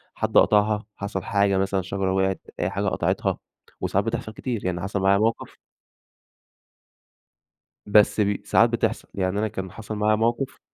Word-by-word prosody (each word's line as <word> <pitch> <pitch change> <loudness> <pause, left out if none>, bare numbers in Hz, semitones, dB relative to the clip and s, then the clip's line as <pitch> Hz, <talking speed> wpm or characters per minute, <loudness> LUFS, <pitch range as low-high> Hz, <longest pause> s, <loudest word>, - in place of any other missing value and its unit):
حد - - 0
قطَعها، 105 0 +4
حصَل 100 -1 -4
حاجة 100 -1 +2
مثلًا 95 0 0
شجرة 95 +1 -2
وقعِت 95 0 0 0.2
أي - - 0
حاجة - - -2
قطَعِتها، - - 0 0.4
وساعات 100 +2 0
بتحصل 115 -1 -3
كتير، 115 -3 -4
يعني 90 -2 -1
حصَل 100 +1 -2
معايا 95 +1 +4
موقف 115 +2 -1 2.3
بس 105 +1 +4
بي 100 -1 0
ساعات - - +4
بتحصَل، - - -1
يعني 95 +1 -1
أنا 110 - +1
كان 95 -3 -6
حصَل 110 +2 -7
معايا 105 +1 +2
موقف 120 +4 -1
100 Hz, 150 wpm, -24 LUFS, 95-110 Hz, 2.3 s, قطَعها